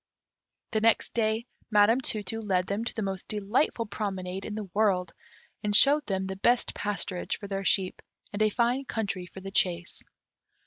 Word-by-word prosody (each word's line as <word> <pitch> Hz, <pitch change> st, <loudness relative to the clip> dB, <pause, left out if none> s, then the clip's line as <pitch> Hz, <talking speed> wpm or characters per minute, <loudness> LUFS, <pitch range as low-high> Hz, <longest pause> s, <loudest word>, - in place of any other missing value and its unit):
The 220 Hz, -, 0 dB
next 225 Hz, 0 st, +2 dB
day 220 Hz, 0 st, 0 dB, 0.2 s
Madame 220 Hz, +3 st, +4 dB
Tu 215 Hz, -4 st, 0 dB
tu 225 Hz, +4 st, -3 dB
led 185 Hz, -4 st, +1 dB
them 200 Hz, +4 st, -2 dB
to -, -, -3 dB
the 220 Hz, -, -2 dB
most 195 Hz, -1 st, -4 dB
delightful 215 Hz, +4 st, 0 dB
promenade 195 Hz, -3 st, -4 dB
in 210 Hz, -, -5 dB
the 215 Hz, -2 st, -5 dB
world, 190 Hz, -5 st, +1 dB, 0.5 s
and 205 Hz, -1 st, +1 dB
showed 290 Hz, +6 st, +6 dB
them 190 Hz, -1 st, -1 dB
the 190 Hz, 0 st, -5 dB
best 240 Hz, +5 st, +2 dB
pasturage 200 Hz, -3 st, -2 dB
for 200 Hz, -, -8 dB
their 195 Hz, 0 st, -3 dB
sheep, 190 Hz, -1 st, +1 dB, 0.3 s
and 205 Hz, -, -3 dB
a 215 Hz, -, +4 dB
fine 245 Hz, +5 st, 0 dB
country 200 Hz, -7 st, -3 dB
for 190 Hz, -, -10 dB
the 195 Hz, +1 st, -7 dB
chase. 180 Hz, -2 st, 0 dB
205 Hz, 180 wpm, -28 LUFS, 190-220 Hz, 0.5 s, showed